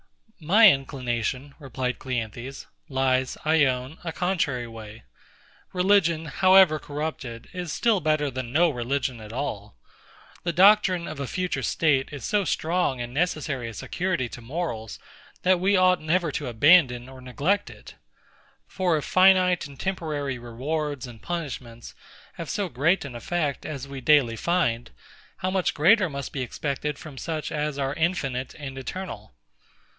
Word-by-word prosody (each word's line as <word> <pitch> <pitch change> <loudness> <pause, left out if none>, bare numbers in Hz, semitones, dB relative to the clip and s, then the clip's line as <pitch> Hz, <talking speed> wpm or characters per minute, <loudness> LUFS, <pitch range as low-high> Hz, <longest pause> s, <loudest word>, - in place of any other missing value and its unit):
My 200 +7 +7
inclination, 130 0 -3
replied 130 -3 -3
CLEANTHES, 125 +1 -5 0.2
lies, 130 -1 +1
I 155 -1 +4
own, 130 +3 -2
a 165 - -3
contrary 160 -9 -1
way. 110 -1 -10 0.7
Religion, 180 -3 +2
however 185 0 +5
corrupted, 145 -6 -5
is 180 -3 -4
still 225 +1 +2
better 155 -3 +1
than 130 -2 -5
no 165 +4 +4
religion 125 -1 -2
at 105 0 -10
all. 110 - -5 0.6
The 170 - -2
doctrine 185 -1 +5
of 155 - -7
a 140 - -3
future 180 +4 -2
state 140 -5 +1
is 145 -4 -7
so 210 -1 +1
strong 165 -6 0
and 120 0 -5
necessary 145 -6 -1
a 115 - -10
security 180 - -2
to 120 - -9
morals, 115 -4 -4 0.5
that 185 -1 +4
we 195 +3 +2
never 180 -2 +3
ought - - -7
to - - -3
abandon 125 0 +4
or 130 -1 -12
neglect 150 +11 0
it. - - -13 0.7
For 180 -4 0
if 150 - -4
finite 185 -2 +4
and 140 -2 -14
temporary 150 -8 -3
rewards 140 +4 -3
and 120 -3 -11
punishments 130 -9 -6 0.4
have 165 - -7
so 205 -2 -1
great 155 +5 +1
an 135 - -7
effect, 145 +4 -2
as 140 -3 -6
we 135 -1 -7
daily 135 -5 +4
find; 120 -6 0 0.5
how 185 - -2
much 190 -1 0
greater 185 +5 +4
must 140 -2 -6
be 135 - -3
expected 140 +3 -3
from 145 -4 -10
such 155 +2 -4
as 150 -1 -2
are 135 -1 -1
infinite 145 -6 -1
and 135 -3 -7
eternal? 180 - -7
145 Hz, 150 wpm, -25 LUFS, 130-175 Hz, 0.7 s, My